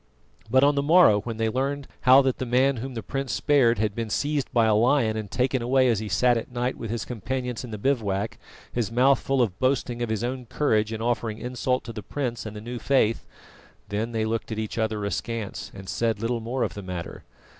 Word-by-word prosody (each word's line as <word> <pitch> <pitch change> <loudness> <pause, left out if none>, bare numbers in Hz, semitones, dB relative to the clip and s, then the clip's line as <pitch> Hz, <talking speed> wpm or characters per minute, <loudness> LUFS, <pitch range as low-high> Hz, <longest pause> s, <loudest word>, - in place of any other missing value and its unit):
But 130 +3 +4
on 145 +1 +5
the 140 - +1
morrow 155 - +6
when 115 0 -5
they 110 0 +1
learned 135 +4 -2 0.2
how 135 +2 +9
that 130 -2 0
the 130 - -2
man 130 +2 +3
whom 130 +2 -6
the 115 - -4
prince 135 -2 -3
spared 125 -6 +3
had 105 -1 0
been 115 0 -4
seized 145 +4 -1
by 115 -2 +3
a 110 - +4
lion 115 0 +3
and 110 -2 -4
taken 130 +3 0
away 130 +1 +3
as 115 -4 +2
he 110 -1 -5
sat 120 +6 +3
at 115 - -5
night 125 +1 -1
with 115 - -6
his 115 +1 -3
companions 125 +2 -4
in 125 - -7
the 110 - -5
bivouac, 105 -5 -1 0.3
his 115 -3 -1
mouth 130 +3 +4
full 135 -2 +1
of 100 -6 -3
boasting 130 -2 0
of 120 - -1
his 110 +1 -1
own 125 0 -3
courage 110 -5 +1
in 110 0 -4
offering 115 -2 -1
insult 125 +1 -1
to 115 0 -7
the 105 - -6
prince 120 -2 -4
and 110 - -8
the 105 - -7
new 120 +2 -6
faith, 115 -5 +1 0.6
then 110 +3 -2
they 110 -1 -1
looked 115 +1 -3
at 110 - -3
each 110 +1 -3
other 110 -2 -1
askance 110 +2 -4
and 95 -1 -11
said 115 +2 -1
little 115 +2 -1
more 120 +3 -2
of - - -2
the 100 - -7
matter. 90 -3 -6
120 Hz, 230 wpm, -25 LUFS, 110-130 Hz, 0.6 s, how